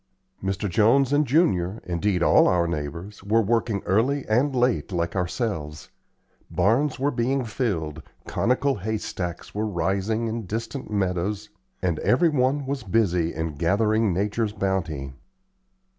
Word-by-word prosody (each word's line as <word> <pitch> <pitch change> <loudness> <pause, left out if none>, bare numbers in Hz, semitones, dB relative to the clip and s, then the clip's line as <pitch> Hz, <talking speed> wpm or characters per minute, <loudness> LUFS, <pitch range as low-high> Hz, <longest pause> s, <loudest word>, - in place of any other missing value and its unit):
Mr. 95 +1 -1
Jones 120 +9 +3
and 145 0 +3
Junior, 115 - +2
indeed 90 +1 0
all - - +5
our 85 -1 +3
neighbors, 85 +6 -5
were 105 +3 +2
working 110 -1 0
early 130 +8 +1
and 130 +6 +2
late, 120 - +1
like 85 0 -2
ourselves. 90 - -3 0.6
Barns 115 +10 +2
were 140 +2 +1
being 130 +1 0
filled, 85 - -2 0.2
conical 130 +2 +1
hay 110 +3 -2
stacks 90 -4 -5
were 105 +1 -1
rising 100 +4 -1
in 115 -2 -4
distant 115 +6 -4
meadows, 100 +1 -1 0.3
and 85 -4 0
every 165 +7 +3
one 140 0 +1
was 135 0 -3
busy 90 -5 +1
in 80 0 -3
gathering 105 +5 +2
nature's 105 +4 -1
bounty. 85 -9 -2
105 Hz, 135 wpm, -25 LUFS, 90-120 Hz, 0.6 s, all